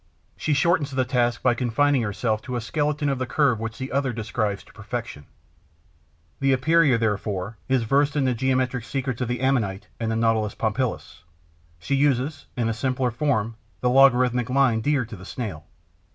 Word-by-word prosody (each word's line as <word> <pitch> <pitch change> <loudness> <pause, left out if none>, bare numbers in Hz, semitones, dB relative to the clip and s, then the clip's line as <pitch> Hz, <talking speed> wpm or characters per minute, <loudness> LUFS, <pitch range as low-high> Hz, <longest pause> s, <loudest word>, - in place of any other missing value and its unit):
She 155 - -1
shortens 160 -1 +2
the 130 -2 0
task 120 -1 0
by 125 - +4
confining 130 +3 +2
herself 110 0 -1
to 125 - -5
a - - 0
skeleton 150 +5 -1
of 135 -2 0
the 130 - -2
curve 135 -7 +2
which 115 0 -5
the 130 0 -5
other 135 -1 0
describes 110 -3 -2
to - - -20
perfection. 110 - -6 1.1
The 135 0 +3
Epeira, 145 0 +4
therefore, 105 -2 -2
is 130 -3 +2
versed 140 +5 +2
in 145 -2 +2
the 130 - +2
geometric 130 0 0
secrets 130 -1 -3
of 125 - 0
the 120 0 -2
Ammonite 105 -7 0
and 115 -1 -1
the - - 0
Nautilus 110 -2 +1
pompilus; 110 - -2 0.6
she 90 - -4
uses, 140 +1 +1
in 120 -2 +1
a 115 - 0
simpler 125 +2 -1
form, 115 -4 -1 0.2
the 125 - +2
logarithmic 125 -2 +4
line 125 -4 +3
dear 140 -1 +1
to 110 - -9
the 95 - -12
Snail. 95 -8 -6
125 Hz, 180 wpm, -24 LUFS, 110-135 Hz, 1.1 s, by